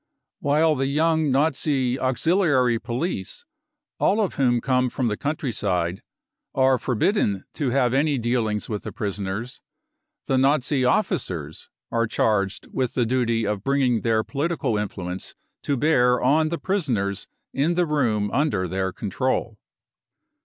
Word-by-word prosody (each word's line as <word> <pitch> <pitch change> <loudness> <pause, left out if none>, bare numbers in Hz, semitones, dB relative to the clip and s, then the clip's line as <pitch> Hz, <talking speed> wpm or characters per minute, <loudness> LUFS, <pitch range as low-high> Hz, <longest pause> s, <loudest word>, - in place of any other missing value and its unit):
" - - -61
While 155 +3 +3
the 135 -1 0
young 160 +1 +2
Nazi 135 -2 +1
auxiliary 130 - +2
police, 120 - -3 0.5
all 205 - +2
of 205 -4 0
whom 125 -3 +2
come 125 +1 +1
from 125 -1 -1
the 105 - -1
countryside, 100 - -2 0.5
are 130 -1 +3
forbidden 115 - 0
to 140 -4 -1
have 125 -1 +2
any 145 +1 +2
dealings 115 -3 -1
with 105 -2 -3
the - - -6
prisoners, 100 +3 -4 0.6
the 130 - +1
Nazi 135 0 +2
officers 90 - -1 0.2
are 115 -1 +1
charged 105 -3 0
with 130 -2 -1
the 125 - +2
duty 115 -2 +1
of 105 -1 -2
bringing 130 -4 +2
their 110 -1 +1
political 145 -4 -1
influence 95 -3 -4 0.3
to 140 - -1
bear 125 -4 +3
on 155 +5 +3
the 170 - -2
prisoners 120 - -1 0.3
in 155 +6 +1
the 180 0 +2
room 115 -10 0
under 105 -11 +1
their 95 +1 -2
control. 110 +2 -2
125 Hz, 140 wpm, -24 LUFS, 105-145 Hz, 0.6 s, While